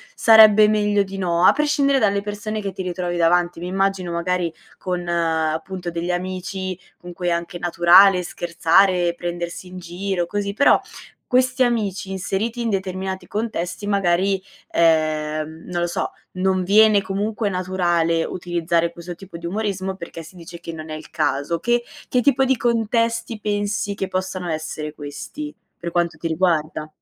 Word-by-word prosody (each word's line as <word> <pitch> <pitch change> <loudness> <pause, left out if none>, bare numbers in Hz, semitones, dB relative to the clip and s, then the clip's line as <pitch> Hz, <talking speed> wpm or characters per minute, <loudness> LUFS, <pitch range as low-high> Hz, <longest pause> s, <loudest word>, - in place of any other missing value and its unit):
sarebbe 215 -2 +7
meglio 205 -1 +2
di 195 0 -8
no, 175 -2 0
a - - +9
prescindere 285 -2 +2
dalle 200 -3 +2
persone 210 +1 -4
che 200 -1 -3
ti 190 - -6
ritrovi 175 -1 -3
davanti. 175 0 +2
Mi 175 - -5
immagino, 190 -1 -1
magari, 170 0 -1 0.2
con, 180 -1 -3
appunto, 170 +1 -1
degli 170 +1 -3
amici 185 +1 -3 0.2
con 175 - -10
cui 175 +1 -4
è - - +2
anche 170 +1 -3
naturale 180 +2 +6
scherzare, 175 0 +2
prendersi 175 +1 -5
in 180 0 -9
giro, 180 +1 -3
così. 200 +1 -2
Però, 280 - +5 0.5
questi 255 0 +2
amici, 210 -5 -1
inseriti 200 +5 -2
in 230 - -1
determinati 190 -1 -3
contesti, 205 -4 -3
magari, 195 -1 +1 0.3
ehm, 155 -1 +1
non 175 -1 -3
lo 175 - +1
so, 170 - -2 0.2
non 185 0 +1
viene 210 +2 +5
comunque 205 +2 -2
naturale 175 -3 +1
utilizzare 170 -1 -1
questo 175 +1 -8
tipo 190 -1 -11
di 170 0 -6
umorismo 190 -1 -2
perché 170 -2 -8
si 165 +3 -14
dice 170 0 -10
che 170 - -7
non 155 -1 -8
è - - -3
il 155 - -10
caso. 145 +4 -1
Che 240 +5 +1 0.2
che 250 - +1
tipo 270 +1 +3
di 265 0 +3
contesti 230 -1 0
pensi 205 -1 -1
che 195 - -3
possano 185 -1 -3
essere 155 -1 -4
questi, 155 - -7 0.3
per 170 - -4
quanto 170 0 0
ti 165 - -2
riguarda? 160 -2 0
185 Hz, 160 wpm, -21 LUFS, 170-205 Hz, 0.5 s, a